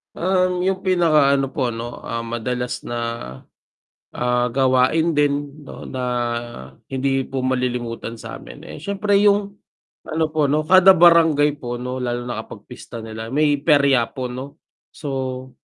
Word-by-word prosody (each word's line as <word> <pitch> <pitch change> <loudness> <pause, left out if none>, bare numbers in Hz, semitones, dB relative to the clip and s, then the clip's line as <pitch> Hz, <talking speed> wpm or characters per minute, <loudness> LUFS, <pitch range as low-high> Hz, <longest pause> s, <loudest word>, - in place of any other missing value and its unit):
Um, 180 0 +1
yung 190 +1 -1
pinaka 155 -6 +4
ano 135 -1 0
ano - - -23
po 140 - -2
ano, 120 +1 -6
ah, 115 0 -3
madalas 120 +2 -4
na, 120 0 -4 1.2
ah, 125 0 +1
gawain 130 +6 +2
din 145 -1 -1
no, - - -10
na 130 -1 -4 0.8
hindi 135 -1 -1
po 135 -1 -4
malilimutan 125 -3 -2
sa'min, - - -10
eh - - -9
siyempre 200 0 0
yung 200 0 +2 0.5
ano 160 0 0
po 155 -2 +1
'no, 150 +2 +1
kada 185 +3 +7
barangay 160 -4 +5
po 120 -1 -5
no 125 +1 -4
lalo 120 -1 -2
na 110 - -3
kapag 110 -1 -9
pista 115 -2 -9
nila 110 0 -7
may 145 +3 +1
perya 140 -5 +3
po 125 -2 -6
no. 130 +3 -8 0.3
So 130 -2 -4
135 Hz, 150 wpm, -21 LUFS, 125-160 Hz, 1.2 s, kada